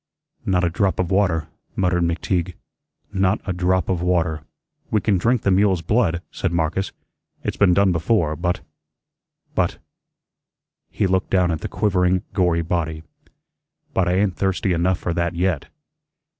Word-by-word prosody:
"Not 90 -1 +2
a 85 - +3
drop 95 +2 +1
of 90 0 0
water," 90 -6 +2 0.3
muttered 90 -2 +1
McTeague; 85 +1 -1 0.6
"not 95 +1 +2
a 95 - -1
drop 90 +1 +1
of 90 -2 0
water." 85 -4 +1 0.5
"We 110 - +2
can 100 -3 +1
drink 120 +4 +1
the 100 - +3
mule's 95 -2 +3
blood," 85 -3 +1
said - - -2
Marcus. 85 +3 -1 0.5
"It's - - -2
been 90 -3 +4
done 100 -1 +4
before. 85 -2 +1
But 90 +2 -1 0.9
but - - 0 0.6
" - - -65 0.3
he - - 0
looked 95 0 +1
down 90 -2 +2
at 80 - -2
the - - -3
quivering, 90 -2 +1
gory 90 -4 +2
body 80 -2 -2 0.9
"but 95 -2 +2
I 90 - +2
ain't 95 -1 +1
thirsty 95 0 0
enough 90 +2 +1
for 85 - -3
that 85 0 -1
yet." 85 -4 0
90 Hz, 155 wpm, -22 LUFS, 85-95 Hz, 0.9 s, been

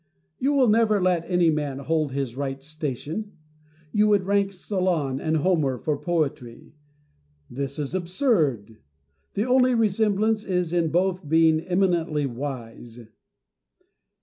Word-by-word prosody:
You 275 +3 +1
will 270 -3 +4
never 215 -1 +3
let 180 -2 0
any 175 -3 +3
man 145 -3 -2
hold 150 +1 -1
his 135 -3 -3
right 135 0 -4
station: 155 - -5 0.6
you 210 +3 +3
would 205 -2 +3
rank 200 0 +1
Solon 180 -8 -1
with 155 +2 -1
Homer 155 -8 +1
for 150 +4 -1
poetry. 145 -7 -3 0.8
This 140 +2 -4
is 145 0 -4
absurd. 170 - 0 0.6
The 205 +2 0
only 255 0 +3
resemblance 215 0 +1
is 180 -4 -1
in 170 -2 +1
both 180 -1 0
being 160 0 +4
eminently 170 -4 0
wise. 120 -3 -7
165 Hz, 125 wpm, -24 LUFS, 140-195 Hz, 0.8 s, will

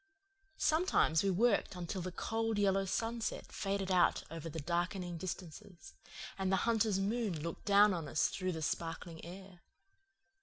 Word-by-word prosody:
Sometimes 310 - +3
we 200 - +1
worked 200 +1 +2
until 180 +1 -4
the 185 +1 -4
cold 225 +3 -1
yellow 195 -1 +2
sunsets 225 +4 -2
faded 195 -1 -2
out 180 -2 +3
over 165 0 -6
the 160 - -5
darkening 175 +3 -2
distances, 175 0 -7 0.5
and 190 0 0
the - - +4
hunter's 220 -4 +2
moon 205 -3 -1
looked 165 +2 -6
down 205 0 +6
on 165 -4 -3
us 145 +1 +2
through 185 -1 -2
the 160 -1 -4
sparkling 165 +1 -4
air. 185 +1 -10
185 Hz, 150 wpm, -34 LUFS, 170-205 Hz, 0.5 s, down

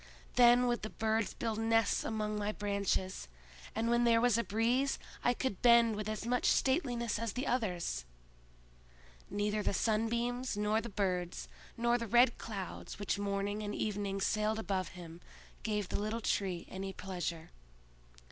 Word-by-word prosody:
Then 245 0 +6
would 240 -1 0
the 215 - -4
birds 220 -2 -1
build 225 -2 -2
nests 225 0 +2
among 215 -1 -2
my 210 0 -1
branches; 200 - -1 0.5
and 225 +1 0
when 235 +1 +3
there 230 -1 +5
was 240 -2 +4
a 235 - +2
breeze, 240 +6 +1 0.3
I 245 - +3
could 245 -8 -2
bend 235 -2 +6
with 210 0 -3
as 215 0 -4
much 250 +1 +1
stateliness 245 - +1
as 230 -3 -2
the 250 - -2
others!" 180 - -1 1.3
Neither 205 +1 0
the 200 - 0
sunbeams, 235 +3 0
nor 210 +1 +1
the 235 - -6
birds, 180 -4 -2 0.3
nor 240 +1 +2
the 230 - -4
red 240 +2 +4
clouds 200 -5 -6
which 205 0 -1
morning 200 +1 -1
and 210 0 -3
evening 200 -2 -2
sailed 215 +2 +1
above 195 -4 -1
him, 170 -1 -10 0.4
gave 210 -3 -2
the - - -1
little 215 +3 -2
Tree 190 -4 -1
any 190 0 -5
pleasure. 175 -4 -5
215 Hz, 155 wpm, -33 LUFS, 200-235 Hz, 1.3 s, Then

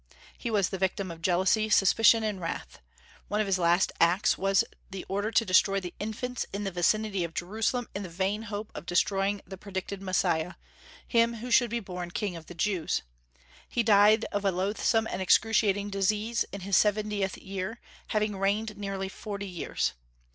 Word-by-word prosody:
He 235 - -5
was 205 -4 +2
the 190 - -4
victim 190 0 -1
of 165 0 -10
jealousy, 190 +5 +2
suspicion, 225 +3 +5
and 210 -4 -2
wrath. 165 - -5 0.5
One 210 - -1
of 215 - +2
his 190 -2 +1
last 175 +2 +3
acts 175 +4 +4
was 195 0 +2 0.3
the 195 -1 -7
order 200 +3 -1
to 230 0 +2
destroy 195 +1 +4
the 180 -2 -7
infants 230 +4 -3
in 200 +1 -4
the 195 - -2
vicinity 195 +2 +1
of 170 -1 -6
Jerusalem 220 +6 -1
in 200 - -4
the 190 - -6
vain 190 +5 -1
hope 210 0 -5
of - - -8
destroying 195 +3 +1
the 190 +1 -9
predicted 195 0 -5
Messiah, 180 -3 0 0.5
him 235 -1 +3
who 240 +3 -7
should 240 0 +5
be 235 +2 -1
"born 180 -4 -6
king 195 0 -3
of 165 -1 -10
the 175 - -10
Jews." 180 -2 0 0.7
He 240 - 0
died 215 +1 +5
of 205 0 -2
a 195 - +3
loathsome 205 +4 +1
and 190 -3 -4
excruciating 205 0 +3
disease, 210 +4 0
in 200 - -6
his 195 +1 0
seventieth 210 -2 +1
year, 195 +4 -5 0.3
having 215 -1 0
reigned 210 +2 0
nearly 195 -1 -3
forty 200 0 -6
years. 175 - -2
200 Hz, 180 wpm, -28 LUFS, 185-215 Hz, 0.7 s, suspicion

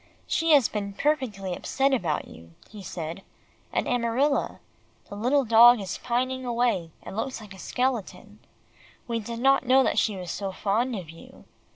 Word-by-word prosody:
"She 330 - 0
has 275 -6 +6
been 200 -2 -4
perfectly 215 -9 -1
upset 270 +7 0
about 190 -10 -1
you," 85 0 -15 0.2
he 210 -1 -10
said, 170 0 -6 0.5
"and - - -1
Amarilla. 245 +4 0 0.5
The - - -7
little 255 +6 +1
dog 235 +1 +7
is 195 -2 -5
pining 255 +2 -1
away, 235 -8 0
and - - -8
looks 255 +4 -3
like 210 -3 -11
a 190 - -13
skeleton. 250 -3 -3 0.7
We 230 -1 -1
did 230 +2 -6
not 270 0 +3
know 265 +1 +6
that - - +1
she 215 - 0
was 180 -2 -6
so 195 0 -4
fond 225 +6 -1
of 175 -6 -7
you. 165 - -15
230 Hz, 170 wpm, -26 LUFS, 195-255 Hz, 0.7 s, dog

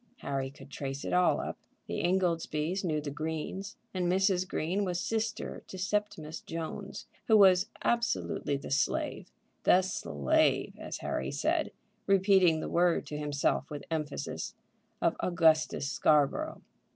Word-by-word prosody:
Harry 135 -1 -2
could 135 0 -14
trace 135 0 -5
it - - -2
all 180 0 +4
up. - - -5 0.3
The - - -3
Ingoldsbys 175 -1 0
knew 155 -4 0
the 145 -1 -5
Greens, 160 +7 -4 0.2
and 180 -2 0
Mrs. 190 -1 +2
Green 180 +6 -1
was 180 -2 -1
Sister 220 +1 -2
to 190 - -8
Septimus 185 -5 -2
Jones, 165 +5 -6 0.2
who 220 - +6
was 190 -1 +6 0.2
absolutely 140 - 0
the 140 - -8
slave, 135 -1 0 0.3
the 185 - +5
slave, 75 - +1
as - - -5
Harry - - -1
said, - - 0 0.4
repeating 190 -4 +4
the - - -3
word 175 -1 +2
to 150 +1 -5
himself 145 -1 0
with 145 -1 -6
emphasis, 150 -3 -3 0.5
of - - +3
Augustus 160 -5 +3
Scarborough. 155 - +2
170 Hz, 140 wpm, -30 LUFS, 150-190 Hz, 0.5 s, who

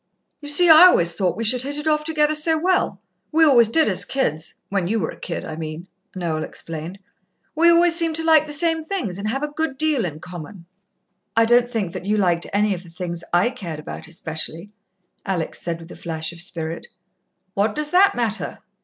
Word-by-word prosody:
"You 290 - -7
see, 350 +5 +4
I 320 +2 +9
always 170 - +3
thought 180 0 -1
we 230 - -2
should 245 +3 +3
hit 285 +3 -2
it 295 +1 -3
off 300 -1 +2
together 305 -1 +1
so 315 +1 +3
well. 365 +3 0 0.3
We 320 +1 +5
always 245 -6 +6
did 315 +8 +3
as - - +2
kids 160 - -2
when 195 -3 -1
you 225 +4 0
were 160 - -2
a - - -11
kid, - - -5
I 155 - -6
mean," 160 +2 -7 0.3
Noel 165 -4 -2
explained. 165 +3 -6 0.6
"We 335 +2 +4
always 340 0 +5
seemed 330 -2 +3
to 325 - +1
like 315 -2 +4
the - - -7
same 325 +1 0
things, 255 - -4
and 205 - -3
have 270 +5 -2
a - - 0
good 310 -2 -3
deal 310 -4 +1
in 155 -4 -5
common." 170 +1 -10 0.7
"I 230 - +5
don't 240 +1 +3
think 210 -8 -3
that 185 - -7
you 210 +1 +1
liked 175 -4 +1
any 205 0 +1
of 180 - -6
the 175 - -15
things 170 -1 -6
I 180 +8 +2
cared 175 -11 -7
about 155 - -8
especially," 165 +3 -6 0.5
Alex 180 -5 -3
said, 170 -1 -3
with 165 +1 -13
a - - -9
flash 160 -1 -5
of 170 - -8
spirit. 165 -2 -5 0.7
"What 210 +2 0
does 300 0 -2
that 390 +2 +5
matter?" 225 -3 -2
215 Hz, 215 wpm, -21 LUFS, -, 0.7 s, I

